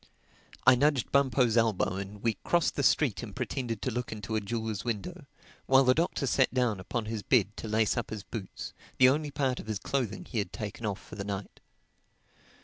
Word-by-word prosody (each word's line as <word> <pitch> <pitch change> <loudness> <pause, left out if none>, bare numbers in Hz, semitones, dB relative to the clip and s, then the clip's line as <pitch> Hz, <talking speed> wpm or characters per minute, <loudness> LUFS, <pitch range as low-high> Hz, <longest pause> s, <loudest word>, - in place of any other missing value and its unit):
I 130 - +9
nudged 140 -2 +2
Bumpo's 130 -4 +3
elbow 115 -5 +2
and 100 +1 -7
we 115 -1 +2
crossed 175 -1 +2
the - - 0
street 135 -5 +3
and 110 -5 -8
pretended 125 -3 -3
to 130 - 0
look 120 +1 -3
into 110 0 -4
a 110 - +1
jeweler's 110 -1 -3
window; 110 -5 -4 0.4
while 135 +1 +6
the 130 -1 +5
Doctor 160 -1 0
sat 130 0 +3
down 125 -6 +1
upon 110 +4 -3
his 110 -1 -3
bed 105 -1 +2
to - - -5
lace 110 0 +2
up 120 -3 -2
his 105 -2 -5
boots, 105 -3 -7 0.2
the 130 0 +7
only 150 +2 0
part 135 -3 -1
of - - -9
his 110 -2 -1
clothing 115 0 -2
he 120 - -3
had 100 - -2
taken 110 +1 -5
off 100 -1 -3
for - - -15
the 100 - -4
night. 100 -1 -5
115 Hz, 205 wpm, -29 LUFS, 105-130 Hz, 0.4 s, I